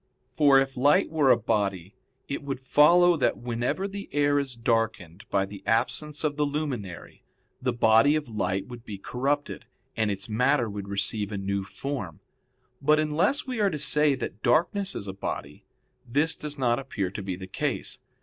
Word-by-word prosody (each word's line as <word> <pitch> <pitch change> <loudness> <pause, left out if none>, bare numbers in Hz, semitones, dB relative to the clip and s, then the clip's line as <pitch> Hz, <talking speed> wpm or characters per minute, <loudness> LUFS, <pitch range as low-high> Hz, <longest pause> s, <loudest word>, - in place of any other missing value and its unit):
For 140 0 +5
if 135 0 +1
light 145 +5 +3
were 150 -4 +3
a 120 - +6
body, 100 -5 -1 0.3
it 140 - -4
would 135 -2 -4
follow 170 +6 +5
that 140 - +1
whenever 120 +10 -2
the 200 0 -7
air 145 0 +2
is 135 -3 -4
darkened 115 -7 -1
by 100 -1 +1
the 100 0 -10
absence 145 +7 0
of 150 -2 -1
the 150 - +2
luminary, 140 - -4 0.4
the 125 0 +1
body 120 +5 +4
of 155 -3 -2
light 100 -3 -2
would 120 -2 -10
be 105 -4 -7
corrupted, 140 +8 -2 0.3
and 110 -2 +1
its 100 0 -3
matter 125 +3 +2
would 100 -1 -6
receive 100 +1 -2
a 105 - -3
new 100 0 -2
form. 100 - -5 0.6
But 150 +2 +4
unless 160 - +1
we 255 -3 -4
are 205 -2 +3
to 155 - -3
say 150 -1 +2
that 110 -5 -6
darkness 195 +4 +1
is 100 - -5
a 95 - -4
body, 75 -6 -6 0.4
this 145 +6 +1
does 150 -1 -6
not 120 -2 +1
appear 105 -9 -3
to 105 - -6
be 95 -2 -4
the 95 +1 -8
case. 95 - -3
125 Hz, 180 wpm, -26 LUFS, 105-150 Hz, 0.6 s, a